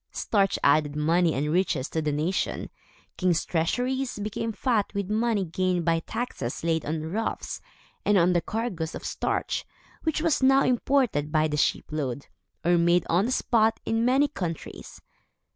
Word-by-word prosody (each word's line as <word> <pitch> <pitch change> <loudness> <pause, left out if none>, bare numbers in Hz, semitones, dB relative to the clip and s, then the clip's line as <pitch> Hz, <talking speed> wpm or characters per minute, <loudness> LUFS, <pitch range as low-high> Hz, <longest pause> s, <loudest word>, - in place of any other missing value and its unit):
Starch 200 -3 +1
added 145 0 +3
money 165 +2 +2
and 150 +3 -1
riches 170 -6 +1
to 160 - -1
the 150 -1 -1
nation. 155 +6 -2 0.5
Kings' 180 -3 +1
treasuries 245 +11 -1
became 210 +2 -3
fat 225 -2 0
with 200 0 -2
money 220 -2 +1
gained 180 0 -1
by 165 -1 +2
taxes 220 - -4
laid 165 -1 +1
on 155 0 -2
ruffs, 225 +4 -3 0.4
and 205 -1 +3
on 180 0 +4
the 175 - +2
cargoes 200 -8 -3
of - - -7
starch, - - -2 0.4
which 315 -2 0
was 325 -3 +1
now 270 +1 +5
imported 245 - +1
by 155 0 +3
the 150 - -2
shipload, 145 -3 -1 0.4
or 175 0 +4
made 170 +1 +3
on 180 +5 +3
the - - -2
spot, 225 -3 +2
in 225 0 +1
many 265 +4 +4
countries. 175 - -6
180 Hz, 160 wpm, -26 LUFS, 160-225 Hz, 0.5 s, now